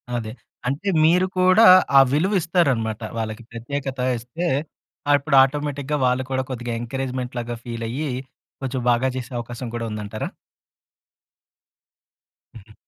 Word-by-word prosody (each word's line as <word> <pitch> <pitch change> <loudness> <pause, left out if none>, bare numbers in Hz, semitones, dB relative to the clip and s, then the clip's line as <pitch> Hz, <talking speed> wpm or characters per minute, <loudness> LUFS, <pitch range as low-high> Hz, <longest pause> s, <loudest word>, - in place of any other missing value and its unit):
అదే. 110 -2 -3 0.4
అంటే 150 +10 -1 0.2
మీరు 180 +3 +4
కూడా 185 +5 +6 0.3
ఆ - - +11
విలువిస్తారనమాట. 155 - +1 0.2
వాళ్ళకి 110 +1 -4
ప్రత్యేకత 135 +3 -5 0.2
ఇస్తే, 125 +10 -5 0.6
ఆహ్, 145 - +7
ఇప్పుడు 140 0 0
ఆటోమేటిక్‌గా 145 +1 -2
వాళ్ళు 125 +1 +1
కూడా, 130 0 0
కొద్దిగ 120 -2 -5
ఎంకరేజ్మెంట్‌ 125 0 -4
లాగా 120 0 -4
ఫీలయ్యి, 120 +5 -3 0.5
కొంచెం 130 -1 -3
బాగా 125 +2 +2
చేసే 125 0 -6
అవకాశం 120 +1 -6
కూడా 115 -1 -3
ఉందంటారా? 105 0 -5 2.3
హుహు. 105 -1 -14
130 Hz, 115 wpm, -22 LUFS, 115-145 Hz, 2.3 s, ఆ